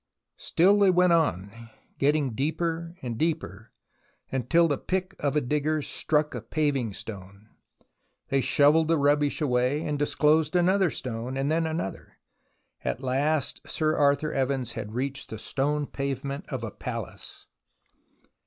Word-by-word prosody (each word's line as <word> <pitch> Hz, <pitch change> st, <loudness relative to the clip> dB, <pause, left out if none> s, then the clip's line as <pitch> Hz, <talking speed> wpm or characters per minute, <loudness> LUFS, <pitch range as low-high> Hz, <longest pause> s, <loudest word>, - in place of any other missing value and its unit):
Still 195 Hz, +5 st, +3 dB
they 200 Hz, -1 st, +5 dB
went 180 Hz, -1 st, +4 dB
on, 115 Hz, -, -1 dB, 0.3 s
getting 145 Hz, -1 st, +2 dB
deeper 165 Hz, +5 st, -2 dB
and 120 Hz, -2 st, -4 dB
deeper, 130 Hz, -, -2 dB, 0.6 s
until 150 Hz, +7 st, +3 dB
the 145 Hz, -3 st, -1 dB
pick 190 Hz, +1 st, -2 dB
of 145 Hz, 0 st, -1 dB
a 150 Hz, -, +3 dB
digger 150 Hz, +4 st, 0 dB
struck 150 Hz, +1 st, 0 dB
a -, -, -4 dB
paving 140 Hz, -9 st, -1 dB
stone. 100 Hz, 0 st, -10 dB, 0.8 s
They 135 Hz, 0 st, +2 dB
shovelled 150 Hz, +4 st, +4 dB
the 165 Hz, 0 st, +3 dB
rubbish 145 Hz, +1 st, +2 dB
away 130 Hz, +2 st, +1 dB
and 150 Hz, -1 st, -2 dB
disclosed 150 Hz, +2 st, +2 dB
another 185 Hz, +1 st, +3 dB
stone, 125 Hz, -1 st, -5 dB
then 155 Hz, +4 st, 0 dB
another. 160 Hz, -, -5 dB, 0.7 s
At 130 Hz, -, -3 dB
last 140 Hz, +3 st, 0 dB
Sir 155 Hz, 0 st, +1 dB
Arthur 145 Hz, +1 st, +2 dB
Evans 135 Hz, -2 st, -1 dB
had 105 Hz, +2 st, -6 dB
reached 135 Hz, +2 st, -3 dB
the 110 Hz, -, -6 dB
stone 145 Hz, +6 st, -1 dB
pavement 140 Hz, +3 st, -4 dB
of 130 Hz, -5 st, -4 dB
a 110 Hz, -, -4 dB
palace. -, -, -7 dB
145 Hz, 135 wpm, -27 LUFS, 130-160 Hz, 0.8 s, they